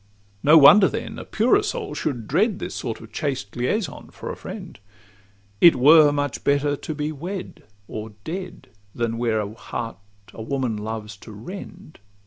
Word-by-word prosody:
No 155 +3 +7
wonder 190 +7 +8
then - - -5
a - - -8
purer 250 - +3
soul 425 0 -4
should 120 -8 -3
dread 195 - +2
This - - -6
sort 115 - -5
of 115 -1 -13
chaste 130 -5 -3
liaison 140 - -2
for - - -7
a - - -6
friend; - - -9 0.8
It 170 - +8
were 150 +3 +7
much 145 -2 -2
better 145 +1 +2
to 155 +2 -6
be 150 +1 -2
wed 175 +6 -6 0.3
or 110 0 -7
dead, 185 +2 -7 0.3
Than 115 -1 -2
wear 115 -2 +1
a 105 0 -4
heart 115 -1 -6 0.4
a - - -8
woman 130 -1 -2
loves 105 -1 -5
to 110 - -12
rend. 180 - -10
140 Hz, 165 wpm, -23 LUFS, 115-175 Hz, 0.8 s, wonder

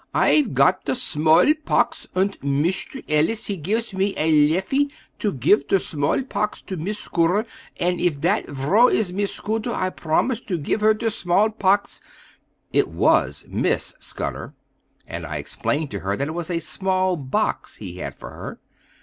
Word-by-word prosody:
I'fe 300 -3 +4
got - - +3
der - - 0
small 165 - +4
pox! - - +1
unt 195 +2 0
Mishter 150 - -1
Ellis 160 +9 +1
he 200 - -2
gifs 210 +7 -2
me 195 +1 0
a 160 +1 +2 0.2
leffy 230 - +1 0.3
to 210 - 0
gif 140 - +2
der 195 - +4
small 150 - -1
pox 210 -5 -3
to 190 - -5
Miss 190 +6 -3
Scutter; 180 +3 +1 0.3
unt 180 0 0
if 160 -5 +1
dat 185 +8 +1
vrow 150 - +3
is 195 -5 0
Miss 200 +1 -1
Scutter, 220 +2 -3
I 185 -5 -1
bromised 225 +11 -1
to 185 -4 -1
gif 160 +7 -1
her 215 0 +5
ter 225 +1 -1
small 205 +1 +2
pox." 200 -1 +1 0.7
It - - +3
was - - +2
Miss - - 0
Scudder, - - -5 0.5
and - - -6
I - - -5
explained 150 0 -2
to 100 - -4
her 100 +2 -2
that 140 +2 -2
it - - -3
was 170 +1 -4
a 175 - 0
small 185 +3 0
box 135 -5 -2
he 90 - -8
had - - -5
for - - -10
her. - - -8
185 Hz, 175 wpm, -22 LUFS, 155-215 Hz, 0.7 s, her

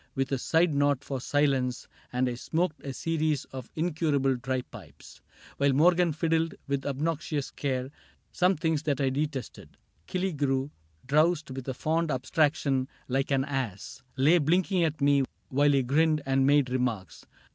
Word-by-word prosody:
With 135 0 -1
a 135 - 0
side 165 +4 +2
nod 145 -1 +1
for 135 -3 -4
silence, 135 -3 0 0.2
and 125 +1 +1
I 125 - -1
smoked 160 +6 -2
A 140 - -4
series 155 0 -1
of 130 -2 -8
incurable 150 -5 +1
dry 125 +1 -2
pipes 75 - -14 0.4
While 140 -1 +3
Morgan 170 +4 +4
fiddled, 165 +1 0
with 140 0 -2
obnoxious 150 0 -2
care. 130 -1 -3 0.4
Some 185 +1 +2
things 160 -1 0
that 145 -4 -1
I 135 -2 +1
detested. 140 -3 -4
— 80 - -40
Killigrew, 145 -7 -1 0.3
Drowsed 155 +2 +2
with 130 0 -7
a 130 - -3
fond 160 +4 0
abstraction, 140 -1 +1 0.2
like 135 +1 0
an 135 -1 +1
ass. 135 -3 -4 0.2
Lay 155 +7 +5
blinking 180 +4 +2
at 160 -1 -1
me 140 -1 +4 0.3
while 145 +2 +3
he 135 -2 +3
grinned 155 +3 +2
and 135 0 +2
made 140 -3 +3
Remarks. 125 -7 -3
140 Hz, 155 wpm, -28 LUFS, 130-160 Hz, 0.4 s, Lay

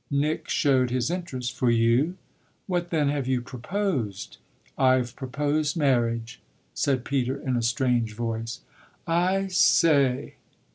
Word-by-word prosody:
Nick 145 +3 -1
showed 130 -4 +2
his 125 +5 -1
interest. 130 -10 -4
"For 125 -1 +1
you? 120 +9 +2 0.5
What 175 -2 -2
then 150 -4 +1
have 140 -3 -2
you 130 -1 +1
proposed?" 125 - -3 0.4
"I've 130 -2 +2
proposed 145 +4 -1
marriage," 120 -5 0 0.3
said 130 -3 0
Peter 135 -1 -1
in 130 -2 -2
a 120 - 0
strange 120 -2 0
voice. 115 0 -4 0.4
"I 180 +4 +1
say 155 -8 +3
130 Hz, 125 wpm, -26 LUFS, 120-155 Hz, 0.5 s, say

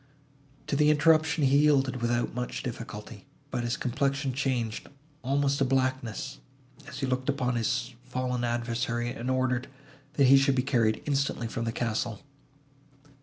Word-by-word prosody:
To 150 - -1
the 150 +1 +4
interruption 155 +1 +4
he 140 +1 +5
yielded 135 -4 +3
without 120 0 0
much 125 +1 -4
difficulty, - - -7 0.2
but 120 - -2
his 120 +2 -1
complexion 135 +1 -1
changed 125 -5 -2 0.3
almost 140 +1 +1
to - - +3
blackness, 130 -3 -1 0.5
as 140 - -7
he - - +1
looked 130 +1 -1
upon 125 -3 0
his 120 +2 -1
fallen 125 -1 -2
adversary, 120 0 -1
and 120 +2 -4
ordered, 130 -1 0 0.5
that 140 - +4
he 135 +1 +8
should 135 0 +3
be 125 - +1
carried 115 -5 +1
instantly 140 -4 0
from 115 +1 -3
the 115 - -1
castle. 115 0 -2
130 Hz, 150 wpm, -28 LUFS, 120-140 Hz, 0.5 s, he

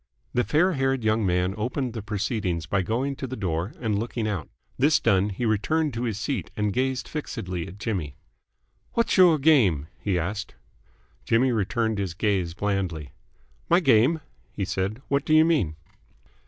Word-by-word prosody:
The 125 - +2
fair 165 +8 +3
haired 135 -3 0
young 110 -1 +2
man 90 +1 +1
opened 125 +2 -2
the 115 - -4
proceedings 100 -4 -2
by 95 +2 0
going 125 +8 -1
to 135 - -4
the 130 - -5
door 90 -2 -2
and 110 -4 0
looking 115 0 -2
out. 95 -7 -3 0.3
This 150 +4 +3
done, 95 +1 +2
he 105 +5 -3
returned 145 +8 +1
to 115 +2 -2
his 110 -4 -2
seat 120 - -2
and 105 -1 0
gazed 130 +1 -1
fixedly 95 - -4
at 95 - -10
Jimmy. 95 - -3 0.8
"What's 235 - +1
your 180 -4 +6
game?" 110 - +3
he 100 -3 0
asked. 100 +5 -3 0.7
Jimmy 125 +3 +3
returned 110 0 0
his 95 -4 -3
gaze 95 -4 0
blandly. 90 -8 -2 0.6
"My 175 - +6
game?" 135 +1 +4 0.3
he 100 - -3
said. 95 +6 -3
"What 140 0 +1
do 155 - +3
you 155 0 +7
mean?" 140 - +1
110 Hz, 170 wpm, -25 LUFS, 95-130 Hz, 0.8 s, you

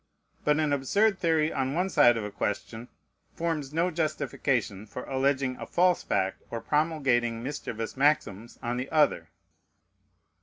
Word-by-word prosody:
But 150 +1 +2
an 150 -2 +1
absurd 195 +9 +2
theory 160 -2 +2
on 135 +1 -1
one 180 +3 +1
side 120 -8 +5
of 110 - -3
a 105 - -5
question 115 +4 -4 0.5
forms 160 -5 -2
no 170 +4 +1
justification 135 - -1
for 125 - -7
alleging 135 -1 0
a - - -7
false 180 0 +3
fact 95 -1 -1
or 115 - -4
promulgating 130 -7 0
mischievous 120 -5 -5
maxims 125 -6 0
on 120 +1 -2
the 130 +2 -4
other. 150 -2 +2
135 Hz, 145 wpm, -28 LUFS, 120-155 Hz, 0.5 s, side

